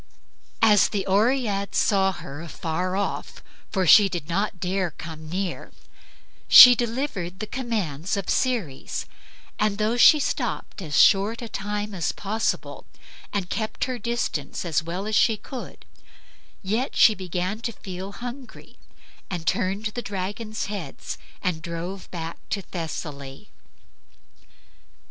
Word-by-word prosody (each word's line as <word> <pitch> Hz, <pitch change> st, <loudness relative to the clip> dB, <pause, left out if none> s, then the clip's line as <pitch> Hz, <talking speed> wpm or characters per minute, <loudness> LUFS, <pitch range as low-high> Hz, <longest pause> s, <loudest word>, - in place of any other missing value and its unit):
As 210 Hz, -2 st, +6 dB
the 200 Hz, -3 st, -2 dB
Oread 205 Hz, 0 st, +1 dB
saw 195 Hz, -2 st, +3 dB
her 145 Hz, -4 st, -8 dB
afar 170 Hz, +2 st, -3 dB
off 200 Hz, -, -3 dB, 0.3 s
(for 190 Hz, -2 st, 0 dB
she 200 Hz, +4 st, +8 dB
did 170 Hz, -5 st, -5 dB
not 195 Hz, +2 st, -1 dB
dare 185 Hz, 0 st, -1 dB
to 155 Hz, -, -26 dB
come 155 Hz, -1 st, -8 dB
near), 185 Hz, +1 st, -4 dB, 0.8 s
she 250 Hz, -1 st, +12 dB
delivered 230 Hz, -7 st, -3 dB
the 215 Hz, -, -3 dB
commands 205 Hz, -, -2 dB
of 200 Hz, -, -4 dB
Ceres; 220 Hz, -, -1 dB, 0.5 s
and, 210 Hz, -1 st, +1 dB
though 220 Hz, +3 st, +1 dB
she 300 Hz, +5 st, +8 dB
stopped 210 Hz, -, -3 dB
as 155 Hz, -5 st, 0 dB
short 205 Hz, +3 st, +5 dB
a -, -, -5 dB
time 210 Hz, 0 st, -4 dB
as 175 Hz, -4 st, -1 dB
possible, 215 Hz, +3 st, -2 dB, 0.5 s
and 190 Hz, -3 st, -3 dB
kept 220 Hz, -1 st, -2 dB
her 255 Hz, -1 st, -3 dB
distance 235 Hz, -, -3 dB
as 165 Hz, -3 st, +1 dB
well 175 Hz, +4 st, -4 dB
as 215 Hz, -, -3 dB
she 225 Hz, 0 st, +4 dB
could, 250 Hz, +4 st, -9 dB, 0.8 s
yet 220 Hz, +7 st, -1 dB
she 220 Hz, -, +7 dB
began 185 Hz, +1 st, -3 dB
to 230 Hz, 0 st, -3 dB
feel 190 Hz, -1 st, -8 dB
hungry, 245 Hz, +4 st, -9 dB, 0.5 s
and 175 Hz, -4 st, -4 dB
turned 195 Hz, +6 st, 0 dB
the 240 Hz, -, -3 dB
dragons' 205 Hz, +2 st, -4 dB
heads 195 Hz, -9 st, -6 dB, 0.2 s
and 180 Hz, -4 st, -1 dB
drove 170 Hz, +3 st, -6 dB
back 165 Hz, -1 st, -6 dB
to 205 Hz, -5 st, -2 dB
Thessaly. 150 Hz, -6 st, -7 dB
195 Hz, 135 wpm, -24 LUFS, 175-220 Hz, 0.8 s, she